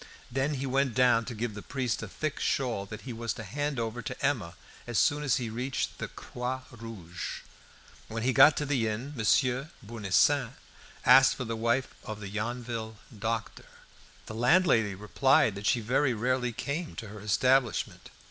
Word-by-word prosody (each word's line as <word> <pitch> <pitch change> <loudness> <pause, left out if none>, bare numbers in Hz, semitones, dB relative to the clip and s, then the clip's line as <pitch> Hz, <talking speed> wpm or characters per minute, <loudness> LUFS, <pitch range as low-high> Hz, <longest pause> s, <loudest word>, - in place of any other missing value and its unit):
Then 135 +4 0
he 135 0 -3
went 135 -1 +1
down 125 -3 +4
to 120 - -6
give 115 0 -3
the 105 - -7
priest 125 -3 -2
a - - -5
thick 155 -1 -4
shawl 120 -8 -1
that 105 - -8
he 125 - -6
was 115 0 -3
to 115 - -7
hand 145 +6 -2
over 115 +1 -3
to 120 - -4
Emma 105 -12 -1 0.3
as 120 -2 -2
soon 145 +1 +3
as 140 -4 +2
he 120 - -2
reached 125 +4 -3
the - - -3
"Croix 125 +1 -5
Rouge." 110 -8 -7 0.7
When 115 0 -4
he 130 +1 +2
got 150 +4 +7
to 150 - 0
the 135 -6 +1
inn, 120 +7 -4
Monsieur 125 +4 +2 0.2
Bournisien 115 +5 +2 0.5
asked 135 +2 +7
for 125 - -4
the 115 0 -3
wife 115 +3 0
of 110 -1 -6
the 100 -2 -6
Yonville 115 +1 -4 0.2
doctor. 115 +1 -3 0.6
The - - -8
landlady 120 - +3
replied 110 +3 +3
that 100 +1 -4
she 120 - +3
very 125 +3 +1
rarely 125 +2 0
came 150 +8 -4
to 110 - -7
her 105 +1 -9
establishment. 120 +4 +1
120 Hz, 175 wpm, -29 LUFS, 110-135 Hz, 0.7 s, got